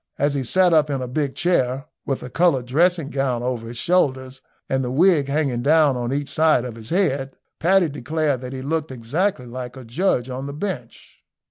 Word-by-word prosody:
As 145 +1 +1
he 140 -2 -1
sat 180 +7 +3
up 155 -2 +4
in 140 -2 -1
a 130 - -4
big 140 +2 -2
chair, 135 -6 +1 0.2
with 135 - -1
the 125 - -7
coloured 165 -7 +2
dressing 165 +3 +1
gown 130 -3 -1
over 120 -2 -3
his 120 +1 -7
shoulders, 130 -6 0 0.3
and 130 0 0
the 125 - -2
wig 155 +1 +3
hanging 140 -4 0
down 150 0 +4
on 120 0 -2
each 140 +1 -2
side 155 -6 +3
of 125 - -5
his 110 -1 -10
head, 140 -8 0 0.2
Paddy 185 +1 +4
declared 145 0 -1
that 125 -1 -6
he 130 -1 -6
looked 155 +2 -2
exactly 130 - -1
like 125 +1 -7
a 130 - -10
judge 125 0 0
on 130 +1 -5
the 140 - -6
bench. 150 - -6
135 Hz, 205 wpm, -22 LUFS, 125-160 Hz, 0.3 s, up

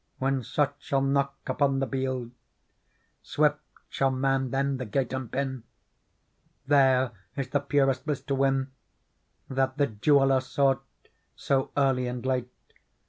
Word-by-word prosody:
When 135 0 0
such 145 +4 0
shall 135 -1 0
knock 140 0 +1
upon 140 -2 +1
the 135 - 0
bield,^ 130 -3 -3 0.9
Swift 150 0 +1 0.3
shall 135 - +1
man 135 0 0
them 135 +1 0
the 130 - -4
gate 130 +3 -1
unpin. 130 0 -3 1.0
There 130 -3 +4 0.3
is 135 -2 -3
the 145 - +1
purest 140 -2 +1
bliss 150 -3 -1
to 140 - -3
win. 135 0 +1 0.8
That 130 0 -1
the 145 - +3
jeweller 135 +3 +3
sought 135 +1 +1 0.5
so 135 -1 0
early 135 -3 +2
and 125 0 -5
late. 130 -2 0
135 Hz, 135 wpm, -27 LUFS, 130-140 Hz, 1.0 s, There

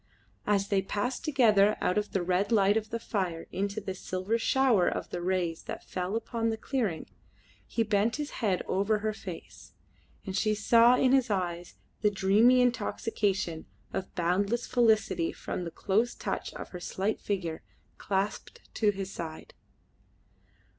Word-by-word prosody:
As 200 -1 +2
they 195 -2 +2
passed 210 - -3
together 215 -9 +4
out 180 - +1
of 210 0 0
the 190 - 0
red 185 +4 0
light 205 -2 +4
of 215 -1 -1
the 230 - -2
fire 185 -7 -3
into 200 +2 -2
the 195 -2 -5
silver 185 +4 -2
shower 240 -6 +3
of - - -5
rays 175 -2 -1
that - - -7
fell 185 +3 -3
upon 230 0 -1
the 220 - -2
clearing 220 - -2 0.6
he 230 - 0
bent 215 +1 +1
his 295 -1 -4
head 195 -5 +1
over 200 +3 +1
her 215 +1 -2
face, 185 -5 -10 0.5
and 190 - -4
she 215 +1 +2
saw 230 +4 +5
in 255 0 +3
his 265 -2 +3
eyes 175 -3 -2 0.3
the 210 - +4
dreamy 210 +6 +4
intoxication 205 -7 -1 0.3
of 190 - -4
boundless 200 +7 0
felicity 220 -8 +2
from 180 - -5
the - - -3
close 210 +8 0
touch - - -4
of - - -7
her 180 - -7
slight 195 +4 -2
figure 175 -6 -3 0.4
clasped 195 +1 -2
to 215 - +2
his 195 -1 -3
side. 160 -2 -7
205 Hz, 155 wpm, -29 LUFS, 185-225 Hz, 0.6 s, saw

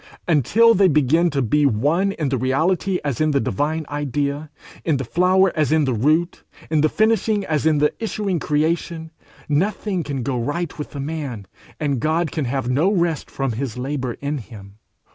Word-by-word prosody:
Until 205 - +4
they 200 -2 +4
begin 155 +2 +3
to 140 -3 -1
be 145 +6 +2
one 150 - +1
in 155 -7 -2
the 135 - 0
reality 170 +9 +1
as 140 -1 -1
in 155 - +3
the 140 -2 +2
divine 150 +9 -1
idea, 145 +1 -2 0.3
in 155 -4 +1
the 135 - -3
flower 185 - +3
as 155 -2 +1
in 155 -2 +3
the 130 - 0
root, 155 - +1 0.3
in 155 -2 +3
the 155 - +3
finishing 215 0 +1
as 155 -1 0
in 155 -1 +3
the 150 +1 +2
issuing 210 -5 -2
creation, 160 +2 -1 0.4
nothing 185 +4 0
can 140 -4 -4
go 125 -1 -1
right 145 +7 -3
with 150 - -5
the 140 - -6
man, 140 -8 -4 0.3
and 140 -4 0
God 160 +5 0
can 155 -4 -2
have 130 0 -2
no 145 +10 +2
rest 170 -5 0
from 135 -2 -2
his 125 +1 -4
labour 130 -1 -3
in 145 +1 -2
him. 105 -3 -12
150 Hz, 185 wpm, -21 LUFS, 135-170 Hz, 0.4 s, Until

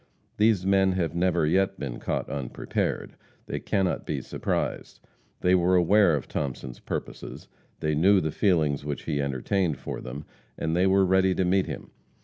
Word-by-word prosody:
These 105 -3 +3
men 95 -1 +3
have 90 -3 -1
never 85 -2 +1
yet 95 +4 +1
been 65 -4 -5
caught - - -2
unprepared 70 -4 -3 0.3
they - - -4
cannot 95 -2 0
be - - -3
surprised. - - -3 0.4
They 90 - +3
were 90 0 +4
aware 90 0 +5
of 70 - -4
Thomason's 65 -3 -4
purposes, - - -6 0.3
they 75 0 0
knew 95 +6 +5
the 80 -3 -2
feelings 80 -6 +1
which 75 -2 -4
he 75 -3 -1
entertained 70 +5 -1
for - - -6
them, 70 +4 -7 0.3
and 80 +1 -1
they 90 +2 +3
were 95 0 +4
ready 95 0 +3
to 95 - +1
meet 95 +1 +2
him. - - -7
90 Hz, 165 wpm, -26 LUFS, 75-95 Hz, 0.4 s, aware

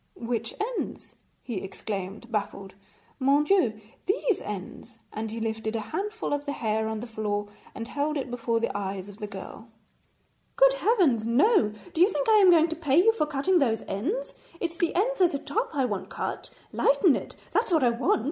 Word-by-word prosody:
'Which 230 -1 -3
ends?' 460 +3 -4 0.3
he 235 -5 -4
exclaimed, 195 +3 -6
baffled. 200 -3 -3 0.5
'Mon 280 +2 +4
Dieu! 290 - +2 0.3
these 395 +2 +1
ends,' 220 +3 -7 0.2
and 220 +1 -3
he 225 +2 -5
lifted 220 0 -2
a - - 0
handful 420 -3 -2
of 290 0 -3
the 285 - -1
hair 220 -3 -1
on 220 -1 -3
the - - -5
floor 210 -2 -3 0.3
and 230 +1 -5
held 295 +3 -1
it 265 -3 -4
before 230 -1 0
the 230 - -2
eyes 195 -1 -3
of 205 +1 -13
the 210 - -4
girl. 200 +3 -9 0.9
'Good - - +6
Heavens, 360 - +2
no! 245 - +4 0.2
Do 325 - 0
you 365 - +8
think 295 -9 -2
I 440 -1 +6
am 390 -3 +7
going 335 -1 +6
to 325 - -3
pay 300 -3 +1
you 435 +6 +6
for 305 -9 0
cutting 305 +6 +2
those 225 -6 +1
ends? 335 - -3 0.3
It's 335 -1 -2
the 340 - 0
ends 445 +4 +1
at 350 -4 +4
the - - +1
top 440 - -2
I 275 -4 +1
want 205 -6 -3
cut. - - -4 0.2
Lighten 385 - +4
it; - - -6 0.2
that's 445 -3 +1
what 320 -5 +4
I 245 - +5
want. 235 0 +1
250 Hz, 195 wpm, -27 LUFS, 220-350 Hz, 0.9 s, you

